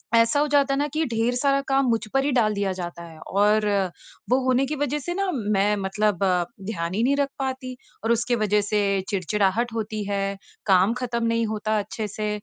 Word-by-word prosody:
ऐसा 230 +5 +4
हो 300 - +2
जाता 285 -1 +3
है 275 - 0
ना 290 - +1
कि 315 +1 +1
ढेर 230 +1 0
सारा 275 +2 +2
काम 270 0 +3
मुझ 230 -1 +2
पर 270 - +3
ही 290 - +1
डाल 225 -5 +2
दिया 200 -2 -1
जाता 175 -2 -6
है। 165 -2 -12
और 210 +2 +2 0.7
वो 255 - +5
होने 260 +1 +3
की 300 +3 -3
वजह 290 +1 -1
से 350 +5 -4
न 395 - +1 0.3
मैं 205 +1 +3
मतलब 200 0 0 0.5
ध्यान 170 -5 -3
ही 215 - +1
नहीं 275 +3 +3
रख 280 -1 +1
पाती। 260 -1 -3 0.3
और 225 - +1
उसके 240 +1 0
वजह 210 -1 +2
से 210 +1 0 0.3
चिड़चिड़ाहट 205 +4 0
होती 215 -1 -3
है, 200 0 -1 0.3
काम 190 +2 +4
ख़त्म 235 -2 -2
नहीं 230 0 +1
होता 215 0 -1
अच्छे 210 +1 -4
से 210 +1 -3
225 Hz, 210 wpm, -24 LUFS, 205-260 Hz, 0.7 s, वो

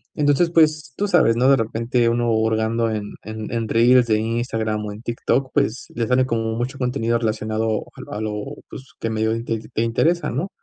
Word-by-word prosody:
Entonces, 150 +3 +2
pues, 155 -4 +2
tú 205 - -1
sabes, 155 -11 +4
¿no?, 130 +2 +4
de 135 - +7
repente 115 +1 0
uno 120 0 +1
hurgando 110 +1 +1
en 105 -1 -4
en 110 0 -6
en 115 -2 -2
reels 120 +2 +5
de 110 -1 +2
Instagram 110 -2 -2
o 105 - -5
en 105 +2 -9
TikTok, 125 +2 -1
pues, 140 -5 0
le 115 -1 0
sale 130 0 +3
como 115 -1 -1
mucho 125 +4 -3
contenido 125 -2 0
relacionado 110 -1 -1
al 105 - -8
a - - -4
lo, 105 -1 -3 0.3
pues, 130 - -9 0.2
que 115 - -2
medio 110 0 0
int 115 +1 -6
te 115 -1 -1
te 110 - 0
interesa, 160 +10 +1
¿no? 155 +11 -2
115 Hz, 205 wpm, -21 LUFS, 110-130 Hz, 0.3 s, de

